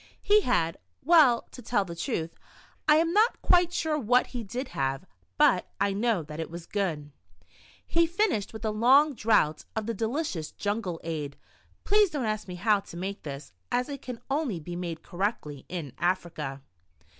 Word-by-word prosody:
He 420 +1 +5
had 165 - 0
— - - -40
well, 275 -9 +7
to 250 - -10
tell 215 -3 0
the 170 -2 -7
truth, 165 0 -3 0.5
I 300 - +7
am 330 +2 +2
not 435 +4 +3
quite 350 -1 +4
sure 320 -3 0
what 250 0 +3
he 240 -2 -3
did 245 +6 -5
have, 135 0 -2 0.3
but 180 - +4
I 200 - +2
know 210 -3 +1
that 150 +1 -8
it 160 - -4
was 170 0 -8
good. 160 -8 -2 0.7
He 335 0 +2
finished 345 - 0
with 220 0 -7
a 215 - +1
long 265 +8 +5
draught 210 - +2
of 220 -1 -2
the 230 - -2
delicious 225 - -2
jungie 205 -4 -2
ade 150 -4 -4 0.5
(please 415 -1 +4
don't 290 -7 -2
ask 215 -1 -2
me 180 - -6
how 205 +3 +3
to 195 -3 -11
make 195 +3 -4
this, 140 - -8 0.2
as 250 +3 0
it 280 -1 -6
can 250 -2 -7
only 275 - -1
be 175 +3 -7
made 170 -2 -5
correctly 175 - -3
in 160 -8 -5
Africa). 165 -6 -2
210 Hz, 180 wpm, -28 LUFS, 165-260 Hz, 0.7 s, well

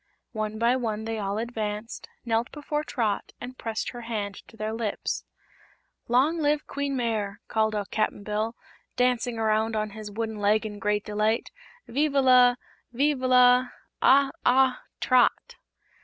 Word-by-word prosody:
One 215 -1 -3
by 235 +3 +3
one 220 -3 -3
they 225 -1 -3
all 200 0 -2
advanced, 220 -1 -4 0.2
knelt 230 0 0
before 295 0 -3
Trot 225 -8 -2
and 250 +1 -8
pressed 225 -1 -3
her 240 - -8
hand 215 -4 -3
to 225 - -17
their 215 0 -3
lips. 225 -2 -3 0.8
"Long 275 +8 +3
live 300 0 +1
Queen 280 -1 -3
Mayre!" 215 -4 -2
called 220 -1 +1
out 205 -2 -3
Cap'n 215 -1 -1
Bill, 215 +2 -2 0.4
dancing 245 -1 +1
around 220 0 +1
on 215 -1 -1
his 215 0 -8
wooden 220 +1 -4
leg 210 +2 +2
in 205 -1 -6
great 210 +1 0
delight; 215 +2 0 0.4
"vive 290 +4 0
la 255 -2 +6 0.4
vive 280 +3 +1
la 250 0 +5 0.3
ah, 275 0 +5
ah 260 +1 +3 0.2
Trot!" 255 -1 +2
225 Hz, 150 wpm, -26 LUFS, 215-250 Hz, 0.8 s, la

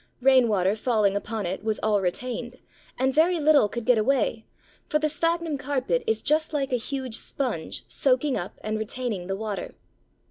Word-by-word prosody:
Rainwater 230 -7 +4
falling 215 -3 +1
upon 210 0 -3
it 185 +3 -4
was 220 -1 -1
all 210 -2 +2
retained, 240 +6 -3 0.4
and 265 +1 +1
very 330 +4 +3
little 290 -8 +5
could 235 +1 -5
get 245 -3 +4
away, 230 -1 +1 0.4
for 300 - +3
the 305 0 +1
Sphagnum 330 -1 0
carpet 285 - -1
is 445 - 0
just 310 +1 +2
like 275 -2 -1
a - - +5
huge 255 -1 -3
sponge 240 - -3
soaking 265 +1 +1
up 175 - -5
and 215 0 -2
retaining 220 -4 -3
the 195 - -2
water. 210 -1 -5
250 Hz, 170 wpm, -26 LUFS, 215-285 Hz, 0.4 s, little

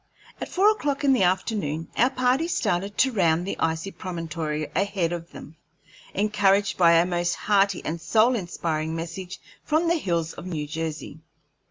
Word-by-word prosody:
At - - -4
four 400 +3 +4
o'clock 290 -9 -2
in 275 -1 +5
the 255 - +2
afternoon 180 -4 0
our 245 - +4
party 255 +5 +1
started 205 - -1
to 265 - +3
round 175 -5 +2
the 195 - -3
icy 165 +4 -1
promontory 160 -4 -4
ahead 195 -4 0
of 170 0 -7
them, 155 - -12 0.6
encouraged 200 -1 +2
by 170 -2 +5
a 170 +1 +5
most 175 -1 -1
hearty 200 -2 +1
and 165 +1 -3
soul 225 +7 +3
inspiring 165 -5 -3
message 180 +3 -6 0.2
from 315 +3 +1
the 340 +1 +3
hills 170 - -1
of 175 - -9
New 155 -5 -3
Jersey. 155 0 -5
180 Hz, 165 wpm, -25 LUFS, 165-210 Hz, 0.6 s, in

